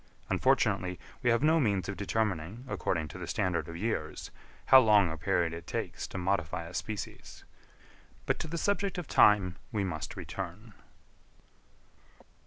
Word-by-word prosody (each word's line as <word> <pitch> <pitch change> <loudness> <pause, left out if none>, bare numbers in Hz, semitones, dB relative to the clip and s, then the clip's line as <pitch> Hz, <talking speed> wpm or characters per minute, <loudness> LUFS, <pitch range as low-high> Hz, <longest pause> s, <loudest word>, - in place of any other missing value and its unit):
Unfortunately 90 -1 +2 0.2
we 125 - +2
have 115 +3 +3
no 160 +2 +5
means 100 - +1
of 100 - -3
determining, 100 +1 -2
according 80 -10 -1
to - - -9
the - - -6
standard 90 -2 -1
of 85 0 -7
years, 90 -6 -3 0.3
how 130 - +9
long 105 -7 +5
a - - -3
period 85 +1 0
it 85 0 -8
takes - - -4
to - - -7
modify 90 -2 -1
a 85 +2 -10
species; 105 +1 -6 0.8
but - - 0
to - - -4
the 170 +2 -4
subject 200 +1 0
of 175 -5 -4
time 95 -3 +4
we 105 -4 0
must 80 -6 -4
return. 95 +4 -7
95 Hz, 155 wpm, -30 LUFS, 85-115 Hz, 0.8 s, how